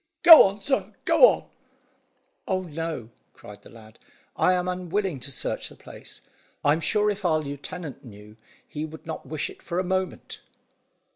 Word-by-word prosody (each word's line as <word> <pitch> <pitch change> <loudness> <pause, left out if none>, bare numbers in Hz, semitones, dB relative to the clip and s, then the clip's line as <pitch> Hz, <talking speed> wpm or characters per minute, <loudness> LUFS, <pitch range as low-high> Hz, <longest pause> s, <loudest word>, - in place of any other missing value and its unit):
"Go 330 -3 +11
on, 200 +2 -7
sir, 270 +6 -1
go - - +7
on!" - - -3 1.0
"Oh, 185 -1 -1
no!" 160 -8 -6 0.2
cried 105 0 -13
the - - -16
lad; 110 -1 -16 0.4
"I 185 - +3
am 180 0 -1
unwilling 180 -2 -2
to 140 - -7
search 130 - -4
the - - -15
place. - - -12 0.4
I'm 145 +3 +3
sure 210 +4 +1
if 205 0 -7
our 165 -3 +2
lieutenant 145 +2 -7
knew 105 -3 -14 0.3
he 150 - -6
would 160 0 -9
not 160 -1 -7
wish 155 -2 -3
it - - -17
for 170 0 -5
a 185 - +1
moment." 185 -1 -4
165 Hz, 165 wpm, -25 LUFS, 145-185 Hz, 1.0 s, Go